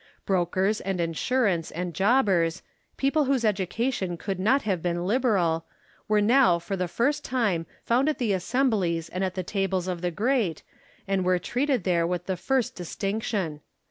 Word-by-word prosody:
Brokers 190 +3 +1
and 190 -1 -2
insurers 170 +2 0
and 175 +1 -4
jobbers, 190 -6 +2 0.3
people 280 +2 +2
whose 260 -3 +1
education 200 -1 -1
could 190 +2 -4
not 260 +9 +3
have 190 -5 -1
been 175 0 -1
liberal, 190 -8 +1 0.4
were 210 0 +3
now 235 -5 +5
for 185 +4 -4
the 180 -1 -1
first 285 - 0
time 205 -11 0 0.2
found 255 +5 +2
at 305 - -1
the 225 -5 0
assemblies 190 -5 0
and 185 +1 -3
at 185 -1 -2
the 185 - -2
tables 190 -1 -1
of 180 -2 -3
the 180 - 0
great, 210 - 0 0.4
and 195 -1 +1
were 180 0 +3
treated 250 - 0
there 170 -2 +2
with 180 0 -2
the 190 - -1
first 255 +4 0
distinction. 195 -3 -3
195 Hz, 165 wpm, -26 LUFS, 175-240 Hz, 0.4 s, now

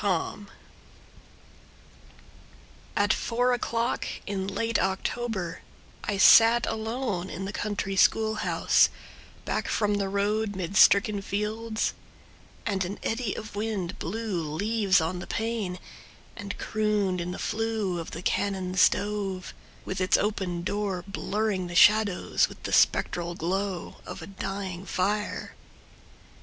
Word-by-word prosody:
Zilpha 200 -4 +2 0.2
Marsh 205 -1 -13 2.5
At 205 -1 +4
four 245 +1 +1
o'clock 235 -1 -1 0.2
in 195 -1 -3
late 230 +4 0
October 190 -1 -2 0.4
I 205 - -1
sat 230 +4 +7
alone 220 -4 -2
in 190 +5 -5
the 200 - -5
country 200 -2 -2
school 220 +3 +4
house - - +3 0.6
Back - - -1
from 210 -1 +1
the 195 -1 -1
road, 205 +1 0
mid 185 0 -4
stricken 200 +2 +5
fields, 220 +3 -2 0.7
And 195 -3 0
an 185 +3 -4
eddy 225 -2 -1
of 210 -2 -8
wind 205 -4 -3
blew 205 0 -2
leaves 195 +4 +2
on 170 +3 -2
the 175 - -7
pane, 225 -5 -2 0.6
And 205 -3 -6
crooned 210 -4 0
in 175 - -4
the 180 - -5
flue 220 -5 -1
of 165 - -6
the 170 - -7
cannon 190 -2 -1
stove, 195 -1 +1 0.3
With 190 0 -3
its 185 - +4
open 190 -5 -1
door 195 -2 -2
blurring 200 -1 -1
the 175 - -7
shadows 210 -1 +4
With - - -14
the - - -4
spectral 175 0 +2
glow 185 +2 -3
of - - -7
a - - -6
dying 195 -2 -5
fire. 210 +3 -1
200 Hz, 130 wpm, -27 LUFS, 185-220 Hz, 2.5 s, sat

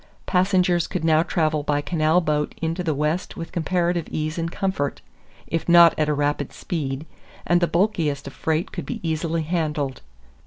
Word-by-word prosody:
Passengers 180 -2 +2
could 180 -4 -3
now 160 -1 +5
travel 155 -2 0
by 145 0 0
canal 160 +2 +2
boat 150 -2 -1
into 165 +2 -2
the 160 -4 0
West 150 +5 -1
with 165 - -6
comparative 175 0 0
ease 155 +2 -3
and 165 0 -2
comfort, 190 -9 -2 0.5
if 165 +1 -3
not 170 -1 +8
at 155 -1 0
a - - +2
rapid 145 -1 -1
speed, 145 -3 -4 0.4
and 175 0 +3
the 175 - +3
bulkiest 165 -7 0
of 140 - -8
freight 160 +4 -1
could - - -6
be 240 - -4
easily 160 +1 -1
handled. 150 -5 -2
160 Hz, 170 wpm, -23 LUFS, 150-175 Hz, 0.5 s, not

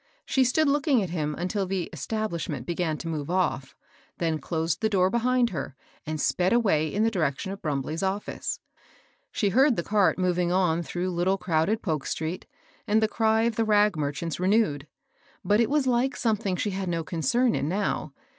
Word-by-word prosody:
She 265 - +2
stood 290 +5 +2
looking 280 -4 +2
at 180 - -5
him 150 -3 -2
until 190 +2 -2
the 190 -1 -1
"establish 215 -7 -3
ment" - - -4
began 170 -2 -1
to 165 - -7
move 155 -2 -3
off, 170 -7 -1 0.4
then 160 -2 -1
closed 160 +3 -2
the 220 - +2
door 190 -2 +2
behind 245 0 +2
her, 140 -5 -5 0.3
and 155 0 -3
sped 180 +6 +1
away 160 -10 +2
in 210 - +1
the 225 - +2
direction 170 -1 -1
of 200 - -7
Brumbley's 150 +1 -2
oflSce. 195 +2 -2 0.7
She 205 - +1
heard 265 +5 +4
the 170 - -2
cart 205 0 +2
moving 180 -1 +1
on 180 -3 +2
through 175 +2 -3
little 180 +3 +1
crowded 180 +5 0
Polk 155 -7 -2
street, 160 +3 -4 0.4
and 215 +1 +3
the 220 - +2
cry 220 0 +2
of 230 -1 0
the 225 - +3
rag 210 -2 +3
merchants' 150 +2 -3
renewed; 180 -7 +1 0.6
but 205 +4 +3
it 235 - +3
was 290 -1 +2
like 255 +2 +1
some 225 -3 +1
thing 195 -2 -2
she 205 +3 -1
had 190 -1 -3
no 165 -1 -1
concern 200 - +1
in 145 - -1
now. 200 +3 -1
185 Hz, 195 wpm, -26 LUFS, 165-220 Hz, 0.7 s, heard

